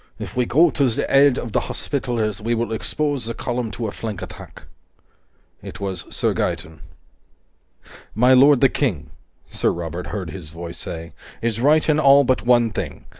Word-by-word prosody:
If - - -8
we 125 -1 +1
go 160 +4 +4
to 140 -3 +2
the 115 - -1
aid 140 -1 +5
of 115 - -5
the - - +2
Hospitallers, 115 -6 -2
we 115 +2 0
will 115 -1 -2
expose 145 +3 -2
the 115 - -4
column 120 -2 -3
to 115 +4 -4
a - - -4
flank 105 -3 -6
attack." - - -11 1.0
It - - -9
was 95 -3 -4
Sir - - -1
Gaeton. 80 0 -3 1.4
"My 125 +4 +5
lord 135 +1 +6
the 135 - +7
King," 110 - -2 0.3
Sir - - -1
Robert 85 +1 -5
heard 95 -6 -5
his 90 -5 -9
voice 85 +1 -8
say, 85 0 -7 0.3
"is 115 -1 -2
right 150 +4 +4
in 155 -1 +3
all 140 -1 +6
but 130 -1 +1
one 120 -2 +4
thing. - - -6
115 Hz, 175 wpm, -21 LUFS, 100-135 Hz, 1.4 s, the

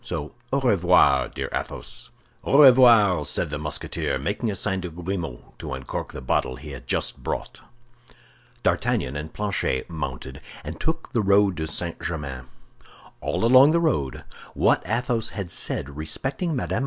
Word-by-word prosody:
So 75 +1 -5 0.2
au 140 - +1
revoir, 90 -8 +4
dear - - -4
Athos." - - -5 0.3
"Au 140 - +2
revoir," 115 - +7
said 75 - -1
the 75 - -3
Musketeer, 75 0 -2
making 115 - -2
a 100 - -2
sign 95 0 -1
to 90 - -5
Grimaud 85 -5 -6
to - - -5
uncork 65 -1 -5
the - - -8
bottle 65 - 0
he - - -10
had - - -10
just - - -1
brought. - - -5 1.0
D'Artagnan 65 - 0
and 75 +2 -5
Planchet 95 -9 -2
mounted, 65 -4 -6 0.2
and 80 +3 -7
took 160 -4 -3
the 115 - +2
road 100 -1 +4
to 80 0 -2
St. 85 +2 -4
Germain. 70 -7 -5 0.7
All - - -1
along 130 +5 +7
the 170 - +3
road, 75 - -1 0.3
what - - +3
Athos 115 0 0
had 95 -4 -4
said 70 +1 -1
respecting 135 - -3
Mme. 125 - -1
90 Hz, 155 wpm, -24 LUFS, 75-120 Hz, 1.0 s, revoir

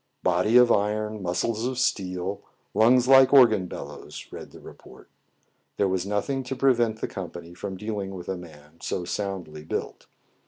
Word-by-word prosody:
" - - -49
Body 105 +7 +3
of 125 -1 +6
iron, 105 +1 0
muscles 110 +6 -1
of 130 -1 -4
steel, 95 -6 -1 0.3
lungs 120 +4 +4
like 135 -1 +7
organ 110 -9 +6
bellows," - - -9
read - - -9
the - - -14
report. - - -15 0.7
There 100 - +2
was 95 0 -1
nothing 105 +7 -1
to 135 - -4
prevent 120 -5 +2
the - - -1
company 85 -3 -8
from 95 +2 -6
dealing 100 -1 -4
with 90 -1 -9
a 95 - -2
man 80 -2 -14
so 90 - -3
soundly 90 -6 -5
built. - - -5
100 Hz, 165 wpm, -25 LUFS, 90-115 Hz, 0.7 s, like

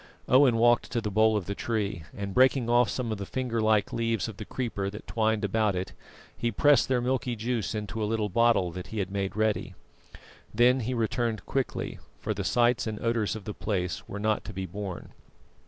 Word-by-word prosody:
Owen 130 -2 +5
walked 120 +1 +4
to 120 - +1
the 105 -2 -3
bole 110 +1 +4
of 100 - -3
the 100 - -3
tree, 100 -7 -2
and 100 -1 -4
breaking 130 0 +4
off 120 0 +4
some 120 -3 -2
of 110 - -3
the 100 - -4
finger 125 -3 -2
like 110 -2 +2
leaves 115 -4 0
of 110 -4 -8
the 105 - -7
creeper 105 -6 -3
that 105 +2 -9
twined 110 -1 0
about 105 0 +1
it, 90 +1 -4 0.4
he 120 - -1
pressed 145 +4 +4
their 130 -2 +1
milky 125 -1 -1
juice 110 -4 -2
into 105 +1 -3
a 105 - -1
little 110 -2 0
bottle 110 -3 +3
that 90 +1 -7
he 110 - -7
had 95 -2 -2
made 100 -1 -2
ready. 110 -1 0 0.8
Then 125 +4 +4
he 125 +1 -2
returned 115 -2 -1
quickly, 135 -2 -2 0.2
for - - -3
the - - -4
sights 120 0 +2
and 110 -1 -4
odours 115 -3 0
of 110 - -7
the 105 - -4
place 90 -5 -3
were 100 - -5
not 105 +1 0
to 105 - -7
be 95 0 -4
borne. 95 -1 -6
110 Hz, 210 wpm, -28 LUFS, 100-120 Hz, 0.8 s, Owen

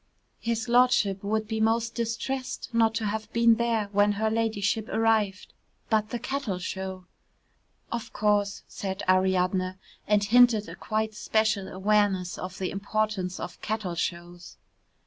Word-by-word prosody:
"His 230 +1 -2
Lordship 235 -5 +3
would 215 +1 -1
be 220 0 -2
most 230 +1 +1
distressed 250 +3 -3
not 225 -1 +3
to 230 -2 -1
have 215 +1 -3
been 230 -1 +5
there 230 -3 0
when 205 0 +3
her 220 +2 0
ladyship 220 -1 0
arrived, 220 -3 +1 0.4
but 215 -1 +2
the 240 - -2
cattle 265 -7 -3
show 190 0 -5 0.4
" - - -41
"Of 235 -1 -4
course," 205 -1 +1
said 190 0 -5
Ariadne, 185 0 +2 0.3
and 210 -1 +3
hinted 235 0 +5
at - - -8
a - - -9
quite 220 0 -2
special 215 -2 0
awareness 195 -2 +1
of 185 +1 -6
the 185 - -2
importance 200 -2 -2
of - - -7
Cattle 215 -4 -2
Shows. 175 0 -5
215 Hz, 145 wpm, -27 LUFS, 190-225 Hz, 0.4 s, been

